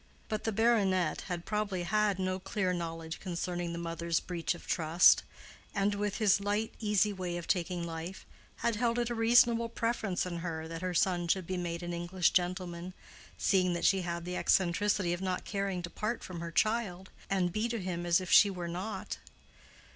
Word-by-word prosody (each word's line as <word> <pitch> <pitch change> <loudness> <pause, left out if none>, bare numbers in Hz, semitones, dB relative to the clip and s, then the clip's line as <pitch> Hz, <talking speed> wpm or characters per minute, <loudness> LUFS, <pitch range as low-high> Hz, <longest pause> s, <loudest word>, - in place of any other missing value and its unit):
But 215 -1 -3
the 225 - +1
baronet 200 -6 +2
had 175 -2 -4
probably 210 -4 -1
had 210 +1 +1
no 185 0 -1
clear 185 -1 -1
knowledge 165 -2 -4
concerning 175 -1 -3
the 170 - -4
mother's 170 0 -1
breach 175 -1 -2
of - - -12
trust, 165 +1 +5 0.5
and 200 +1 +2
with 205 0 -2
his 210 -3 +4
light, 205 +2 -1
easy 210 -1 +2
way 180 -2 -3
of 170 - -6
taking 175 -1 -1
life, 170 +2 -6 0.4
had 230 -2 +2
held 235 0 +1
it 240 0 0
a - - 0
reasonable 235 0 +4
preference 225 -6 -1
in 175 -1 -4
her 165 -2 -4
that 165 0 -6
her 185 -1 -2
son 175 0 +2
should 185 +1 +1
be 185 - -3
made 175 -1 -3
an 175 0 -4
English 175 +1 +1
gentleman, 180 0 -1 0.4
seeing 185 -2 +2
that 170 - -2
she 195 -1 +4
had 170 -1 -4
the 180 0 -4
eccentricity 190 0 +2
of 175 - -4
not 185 -1 -2
caring 195 -3 -2
to 175 - -4
part 225 +2 -3
from 180 -2 -7
her 170 0 -4
child, 195 -2 0 0.2
and 180 -3 +1
be 220 +2 0
to 235 -1 -2
him 180 -2 -3
as 175 0 +3
if 185 -1 -5
she 205 - +8
were 180 -3 -4
not. 185 +6 -5
185 Hz, 190 wpm, -31 LUFS, 175-205 Hz, 0.5 s, she